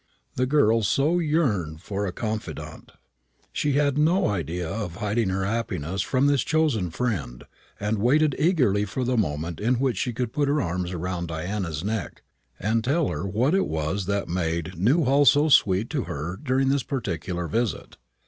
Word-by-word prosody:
The 130 0 0
girl 115 -6 +3
so 140 - +2
yearned 105 - 0
for 100 +3 -3
a - - -2
confidante. 110 +3 -6 0.6
She 145 - 0
had 145 0 +2
no 170 - +3
idea 85 -2 -2
of 95 -1 -4
hiding 105 +1 0
her 95 0 -1
happiness 95 -5 -2
from 130 +6 +1
this 145 -3 +3
chosen 150 - +1
friend, 80 - -3 0.4
and 105 +1 -1
waited 145 +6 +3
eagerly 135 - +3
for 125 +6 -3
the 125 +1 0
moment 80 -5 -1
in 120 +4 +2
which 125 -3 0
she 125 - -1
could 120 0 -3
put 145 -1 +1
her 145 +2 +2
arms 90 - -2
round 85 0 -3
Diana's 85 0 -3
neck 110 +1 -4 0.4
and 110 +3 0
tell 145 +4 +1
her 100 - -3
what 120 - +1
it 195 - +2
was 80 +5 -2
that 100 0 0
had - - -14
made 85 0 -2
Newhall 135 - +3
so 145 +6 +5
sweet 105 -7 +4
to 145 -6 -1
her 75 +5 -4
during 135 +2 0
this 140 0 +2
particular 90 - -3
visit. 115 -3 -2
110 Hz, 175 wpm, -25 LUFS, 90-135 Hz, 0.6 s, so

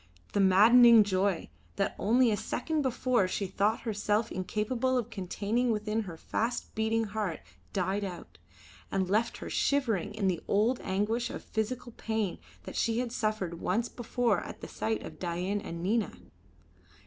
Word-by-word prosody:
The 205 - +1
maddening 220 +4 +8
joy, 190 -2 0 0.3
that 195 - -1
only 235 +3 +4
a - - +2
second 305 +9 -2
before 255 -5 +1
she 195 +2 -2
thought 200 +4 0
herself 215 0 0
incapable 230 +7 -1
of 240 -1 -2
containing 215 +5 -1
within 215 0 -1
her 165 - -8
fast 235 +8 -2
beating 220 +1 +1
heart, 205 -5 -3 0.3
died 195 +1 -1
out, 170 - -7 0.5
and 190 -1 0
left 215 +5 +1
her - - -7
shivering 225 -8 +1
in 200 -3 0
the 180 -3 0
old 225 +5 +2
anguish 210 +5 -1
of - - -7
physical 240 +2 -3
pain 220 -4 -2 0.2
that - - -8
she 230 -1 +1
had 245 -1 -1
suffered 215 -7 -2
once 235 +1 0
before 240 -4 0
at - - -9
the - - -6
sight 220 0 -2
of - - -9
Dain 180 +3 -2
and 170 -2 -6
Nina. 220 +4 +1
215 Hz, 160 wpm, -30 LUFS, 195-235 Hz, 0.5 s, maddening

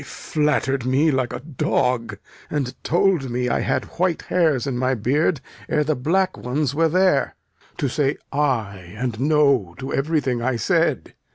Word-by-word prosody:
They - - -11
flatter'd 145 -5 -1
me 135 +5 +2
like 130 -3 0
a - - -5
dog, 125 -4 -1 0.3
and 135 -4 -2
told 175 -5 +2
me 125 +1 -1
I - - +1
had - - -1
white 180 -2 +1
hairs 160 -8 +1
in 135 -3 -2
my 130 +1 +1
beard 140 - +1 0.3
ere 150 - +2
the 155 +1 0
black 185 +8 +1
ones 135 +2 -2
were 165 +2 +2
there. 185 -3 +2 0.4
To 140 - 0
say 140 +2 0 0.2
'ay' 105 -10 -1
and 120 -2 -3
'no' 140 - +2
to 135 +1 -5
everything 135 -4 0
I 125 +1 0
said! 115 - 0
135 Hz, 165 wpm, -22 LUFS, 125-155 Hz, 0.4 s, me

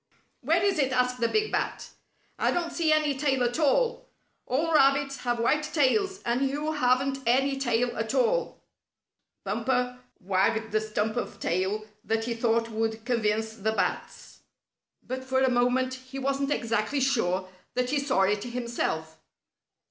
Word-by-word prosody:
"Where - - +1
is 395 -5 +2
it?" 265 -2 +2
asked 250 0 +1
the 230 - +2
big 430 - 0
Bat. - - -2 0.5
"I - - +2
don't 345 -1 -1
see 325 -2 +1
any 305 -2 +2
tail 270 -2 +1
at 245 +5 -1
all. 470 - +1 0.4
All 315 +6 0
rabbits 275 -1 +3
have 240 -1 -2
white 270 +6 +2
tails, 315 +6 +1
and 250 +3 +1
you 300 +3 -2
haven't 270 -1 +1
any 270 +3 +2
at 240 0 0
all." - - +1 0.8
Bumper 250 -1 -1 0.2
wagged 200 +4 0
the 215 0 +1
stump 215 +1 -2
of - - -4
tail 190 +5 -1 0.2
that 225 0 0
he 235 +1 -2
thought 230 0 +1
would 220 0 -2
convince 220 -2 0
the 220 0 -1
bats, - - -3 0.7
but 260 +1 -4
for 260 0 0
a 260 -1 +3
moment, 250 +1 +2
he 260 +1 -9
wasn't 275 +1 -1
exactly 230 +2 0
sure 190 -9 0 0.3
that 250 0 0
he 290 - +2
saw 275 -8 +1
it 200 +1 +1
himself. 235 -10 -3
250 Hz, 155 wpm, -27 LUFS, 225-275 Hz, 0.8 s, rabbits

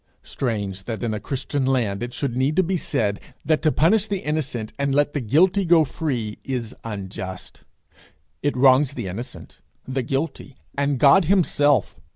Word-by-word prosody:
Strange 100 -7 -3
that 115 0 -4
in 115 -2 -1
a 105 - -3
Christian 135 +4 -3
land 120 -7 0
it 120 0 -4
should 130 -1 -3
need 135 +4 +1
to 190 - +4
be 185 +2 -1
said, 105 - -1 0.3
that 155 +1 +2
to 155 - +3
punish 195 +9 +3
the 200 - -1
innocent 145 -10 -3
and 140 -1 0
let 145 0 +2
the 145 - -1
guilty 180 - +3
go 165 -3 +5
free 125 -7 -3
is 125 -4 -4
unjust! 95 -3 -7 0.8
It 145 -2 -1
wrongs 130 +1 +5
the - - -5
innocent, 100 +7 -8 0.3
the 130 0 -1
guilty, 135 +1 -3 0.2
and 140 0 0
God 145 +7 +6
himself. 150 -6 +2
135 Hz, 170 wpm, -23 LUFS, 115-150 Hz, 0.8 s, God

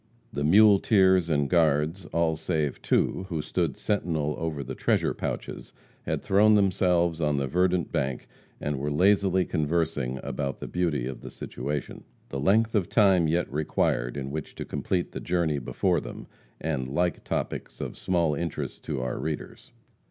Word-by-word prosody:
The 70 - -2
muleteers 95 0 +5
and 70 -3 +2
guards, 80 +2 +2
all 85 -1 +1
save 80 -3 -2
two, 95 - 0
who 80 -4 -2
stood 80 -2 -1
sentinel 80 -7 -1
over 80 -4 -3
the - - -6
treasure - - +1
pouches, - - -5 0.3
had - - -1
thrown 105 +2 +5
themselves 90 -4 +2
on 75 -2 +1
the 70 - 0
verdant 90 +4 +1
bank, 65 -2 -2 0.3
and 75 -2 -2
were 70 +2 -2
lazily 95 +3 +3
conversing 75 -5 -1
about 70 0 -3
the - - -7
beauty 85 -8 -1
of 65 0 -6
the - - -8
situation; 70 +3 -5 0.3
the 70 - -4
length 110 +9 +3
of 100 -5 +1
time 95 -6 +4
yet 85 -1 0
required 70 -4 0
in 70 -1 -4
which 75 0 -5
to - - -5
complete 90 -2 -2
the - - -5
journey 85 -4 0
before 80 +8 0
them, - - -8 0.3
and 75 -5 -2
like 85 +6 -1
topics - - -4
of - - -5
small 85 -4 +1
interest 85 +2 -4
to 65 - -2
our 65 0 -3
readers. 75 -1 -5
80 Hz, 160 wpm, -27 LUFS, 70-90 Hz, 0.3 s, muleteers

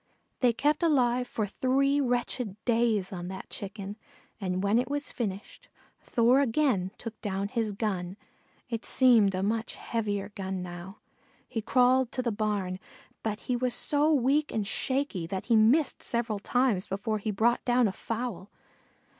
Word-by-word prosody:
They 250 -3 +4
kept 290 +8 +1
alive 250 -6 +2
for 215 - -2
three 275 +6 +1
wretched 245 -4 -1
days 225 -5 +2
on 175 -1 -5
that 190 +1 -8
Chicken, 200 0 -6 0.4
and 185 -2 -2
when 205 +4 +3
it 250 - -2
was 290 0 -2
finished 205 -4 -5 0.3
Thor 240 +2 +3
again 245 -8 +2
took 230 -2 -8
down 200 0 -2
his 225 -1 -1
gun 195 -3 -3 0.5
it 230 -2 -4
seemed 230 -7 +5
a 185 - -1
much 225 +2 -1
heavier 205 -3 -2
gun 190 -2 -4
now. 175 +2 -8 0.5
He 225 - -3
crawled 250 +2 +3
to 255 - -2
the 235 - 0
barn, 205 -4 -2 0.4
but 215 -1 -3
he 250 - -1
was 250 0 +1
so 295 +1 +2
weak 290 +2 +2
and 215 -2 -1
shaky 260 -6 -2
that 190 +2 -4
he 235 - +3
missed 250 +7 +4
several 235 -3 -2
times 240 -3 +1
before 210 +3 -2
he 215 - -3
brought 225 +4 +2
down 245 -1 +3
a - - -1
fowl. 225 -4 -4
225 Hz, 160 wpm, -28 LUFS, 200-250 Hz, 0.5 s, seemed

